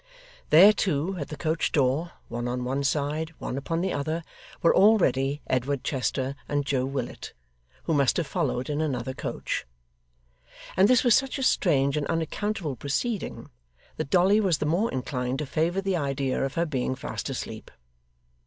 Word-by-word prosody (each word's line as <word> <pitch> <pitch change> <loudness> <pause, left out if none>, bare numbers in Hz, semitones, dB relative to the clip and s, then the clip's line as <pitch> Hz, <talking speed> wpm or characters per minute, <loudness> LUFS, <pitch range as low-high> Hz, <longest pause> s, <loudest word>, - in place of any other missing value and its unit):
There 185 +7 +8
too, 185 -1 0
at 145 - -4
the 150 - -7
coach 160 +1 0
door, 145 +5 +1
one 120 +1 -4
on 125 0 -2
one 135 +3 -1
side, 150 +3 -1
one - - -4
upon 165 +5 -2
the 190 0 -1
other, 155 +4 -2 0.4
were 170 - +5
already 145 - +3
Edward 130 +1 -1
Chester 135 0 -1 0.2
and 145 -1 0
Joe 130 -2 0
Willet, 135 -3 -5 0.5
who 165 - 0
must 140 -3 +3
have 170 - 0
followed 125 -2 -1
in 150 +1 -1
another 130 -4 -2
coach: - - -3 1.1
and 190 +2 +5
this 250 0 +4
was 240 -3 +5
such 270 +4 +2
a 270 - -2
strange 140 - +2
and 145 - -1
unaccountable 165 -1 -2
proceeding, 180 - -3 0.5
that - - -3
Dolly 190 +5 +4
was 190 -7 +2
the - - -2
more 175 +9 +1
inclined 125 0 -2
to 150 - -3
favour 165 +7 0
the 195 -2 0
idea 135 -3 -1
of 135 0 -3
her 170 0 +1
being 130 -4 -1
fast 145 +1 -5
asleep. 110 -4 -6
145 Hz, 170 wpm, -26 LUFS, 135-175 Hz, 1.1 s, There